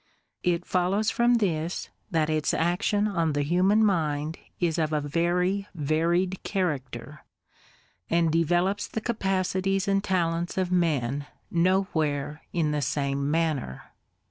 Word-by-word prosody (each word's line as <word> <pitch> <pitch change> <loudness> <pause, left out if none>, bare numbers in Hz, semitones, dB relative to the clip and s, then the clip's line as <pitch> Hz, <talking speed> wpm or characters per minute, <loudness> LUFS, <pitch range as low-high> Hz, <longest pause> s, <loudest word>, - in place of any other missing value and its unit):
It 175 0 0
follows 195 +4 +1
from 240 +1 +3
this, 175 -6 -1 0.2
that 160 -5 +1
its 155 -1 0
action 180 +5 +1
on 165 -6 0
the 145 0 0
human 185 +8 +3
mind 155 -4 0 0.2
is 170 -2 +1
of 155 -1 0
a 150 - +2
very 175 +6 0
varied 170 +5 0
character, 150 - -3 0.9
and 165 -1 +2
developes 175 +5 +1
the - - -3
capacities 195 -3 0
and 195 0 +2
talents 170 -2 0
of 185 -1 0
men 145 -6 0 0.2
nowhere 160 -5 0
in 160 -4 0
the 150 -1 0
same 140 +1 -1
manner. 155 - -1
170 Hz, 125 wpm, -27 LUFS, 150-190 Hz, 0.9 s, from